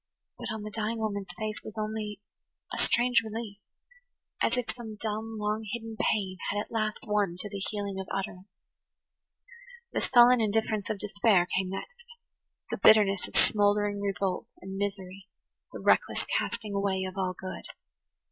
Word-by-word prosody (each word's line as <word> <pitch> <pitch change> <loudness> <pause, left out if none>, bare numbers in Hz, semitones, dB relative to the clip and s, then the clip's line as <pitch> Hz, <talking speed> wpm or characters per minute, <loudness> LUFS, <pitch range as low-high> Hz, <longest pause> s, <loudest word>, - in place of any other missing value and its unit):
But - - -4
on 220 -1 -4
the 215 - -6
dying 220 +1 -2
woman's 205 -3 -2
face 215 +1 -3
was 215 - -8
only 215 -1 -3 0.5
a - - -2
strange 245 0 +4
relief, 220 -2 -6 0.8
as - - +2
if 250 - -1
some 225 -3 -7
dumb, 220 +1 -3
long 210 +1 -1
hidden 225 -1 -5
pain 190 -4 0
had 205 - 0
at - - -5
last 215 -2 0
won 205 -5 +1
to 205 +3 -5
the 200 0 -5
healing 200 -2 -3
of 190 - -5
utterance. 190 -1 -4 1.4
The - - 0
sullen 245 -1 +7
indifference 215 -1 0
of 215 - -1
despair 205 -2 +3
came 190 0 +1
next, 480 - -8 0.5
the - - -1
bitterness 200 -3 +6
of - - -13
smouldering 205 -1 +3
revolt 195 -2 -1
and 190 +1 -6
misery, 195 -1 -4 0.4
the - - -7
reckless - - +3
casting 220 - -1
away 200 -1 +1
of 185 0 -5
all 185 -2 -1
good. 185 0 -6
210 Hz, 155 wpm, -29 LUFS, 195-220 Hz, 1.4 s, sullen